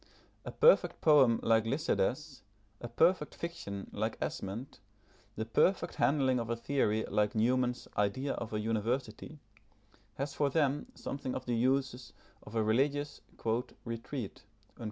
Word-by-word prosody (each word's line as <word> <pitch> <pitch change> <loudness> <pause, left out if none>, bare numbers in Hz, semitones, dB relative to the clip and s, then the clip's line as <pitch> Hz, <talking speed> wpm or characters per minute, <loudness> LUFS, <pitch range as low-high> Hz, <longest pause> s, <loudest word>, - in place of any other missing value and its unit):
A - - -4
perfect 485 +2 +4
poem 135 -7 +5
like 110 -1 +4
Lycidas, 140 +1 -1 0.4
a 120 - -6
perfect 160 +6 +2
fiction 100 -13 -6
like - - -2
Esmond, 105 +8 -5 0.6
the 110 - -3
perfect 180 - +2
handling 135 -3 +2
of 115 -1 -4
a 115 - 0
theory 115 -3 0
like 105 +3 0
Newman's 125 +2 +1
Idea 105 +7 0
of 115 - -5
a 105 - -1
University, 115 +5 -2 0.8
has 140 +1 -3
for 145 -1 +1
them 145 -1 0
something 135 -2 -5
of 130 - -5
the 125 - -1
uses 130 0 0 0.3
of 105 - -11
a 110 - +2
religious 140 +6 0 0.6
"retreat." 115 0 -5
125 Hz, 135 wpm, -32 LUFS, 110-140 Hz, 0.8 s, poem